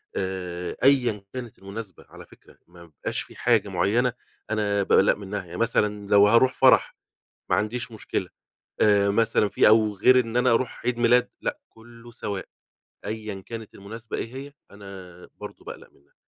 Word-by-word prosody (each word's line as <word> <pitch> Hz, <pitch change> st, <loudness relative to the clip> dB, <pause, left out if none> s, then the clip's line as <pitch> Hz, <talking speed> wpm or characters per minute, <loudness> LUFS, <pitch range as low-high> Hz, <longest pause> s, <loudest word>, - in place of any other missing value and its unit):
آآ، 90 Hz, -2 st, -4 dB
أيًا 125 Hz, -7 st, +3 dB
كانت 125 Hz, -3 st, -7 dB
المناسبة 100 Hz, -1 st, -9 dB
على -, -, -13 dB
فكرة، -, -, -21 dB
ما 85 Hz, 0 st, -15 dB
بيبقاش 80 Hz, -4 st, -4 dB
في -, -, -12 dB
حاجة 115 Hz, -4 st, +2 dB
مُعيّنة 105 Hz, +7 st, +1 dB, 0.4 s
أنا 105 Hz, -2 st, 0 dB
باقلّق 95 Hz, +1 st, +4 dB
منّها 100 Hz, -1 st, -6 dB
ي -, -, -6 dB
مثلًا 105 Hz, -2 st, 0 dB
لو 100 Hz, 0 st, +6 dB
هاروح 115 Hz, +4 st, +4 dB
فرح -, -, +4 dB, 0.6 s
ما -, -, +4 dB
عنديش 115 Hz, +4 st, -2 dB
مشكلة، 110 Hz, -, -4 dB, 0.5 s
آآ 100 Hz, -1 st, +4 dB
مثلًا 105 Hz, 0 st, +2 dB
في -, -, +3 dB
أو 110 Hz, -1 st, +4 dB
غير 125 Hz, +6 st, +5 dB
إن 115 Hz, -1 st, -2 dB
أنا 125 Hz, 0 st, +3 dB
أروح 115 Hz, +1 st, -1 dB
عيد 125 Hz, -1 st, 0 dB
ميلاد 120 Hz, +1 st, +3 dB
لأ، -, -, -3 dB
كلّه 115 Hz, +1 st, -16 dB
سواء 100 Hz, -4 st, -5 dB, 0.6 s
أيًا 105 Hz, -2 st, -5 dB
كانت 115 Hz, -2 st, -8 dB
المناسبة 110 Hz, +3 st, -8 dB
إيه 115 Hz, +3 st, -6 dB
هي، 140 Hz, +2 st, -8 dB, 0.2 s
أنا 95 Hz, -3 st, -12 dB
برضه -, -, -11 dB
باقلق -, -, -10 dB
منّها. 70 Hz, -, -30 dB
105 Hz, 160 wpm, -25 LUFS, 100-115 Hz, 0.6 s, لو